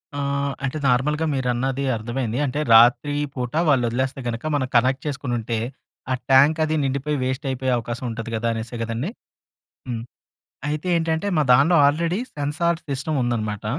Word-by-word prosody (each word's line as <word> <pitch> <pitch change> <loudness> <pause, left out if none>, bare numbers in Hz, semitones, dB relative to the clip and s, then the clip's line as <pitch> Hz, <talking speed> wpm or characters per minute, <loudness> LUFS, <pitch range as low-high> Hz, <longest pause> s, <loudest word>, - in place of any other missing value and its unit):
ఆ! - - -3 0.4
అంటే 135 +3 -2
నార్మల్‌గా 150 +5 +2
మీరన్నది 130 +1 -1
అర్థమైంది. 120 +1 -3
అంటే 140 +2 -2
రాత్రి 125 +6 +6 0.2
పూట 125 -2 -4 0.2
వాళ్ళొదిలేస్తే 130 0 +1
గనుక 115 +2 -3
మనం 130 -2 0
కనెక్ట్ 130 +3 +3
చేసుకొనుంటే 120 -5 -2 0.5
ఆ - - +3 0.2
ట్యాంక్ 140 +4 +5
అదీ 155 0 0
నిండిపోయి 140 +2 -1
వేస్ట్ 130 +3 -2
అయిపోయే 130 0 -1
అవకాశం 120 +2 -5
ఉంటది 115 0 -6
కదా! 115 +1 -1
అనేసే 115 +2 -5
కదండీ! 115 +8 -3 0.8
హ్మ్. 115 -2 -3 0.7
అయితే 155 +4 -3
ఏంటంటే 160 +2 -1
మా 150 - +4
దాన్లో 145 +8 +5
ఆల్రెడీ 170 +6 0 0.2
సెన్సార్ 155 +4 0
సిస్టమ్ 140 +2 -2
ఉందన్నమాట 110 -4 -2
130 Hz, 145 wpm, -23 LUFS, 120-145 Hz, 0.8 s, రాత్రి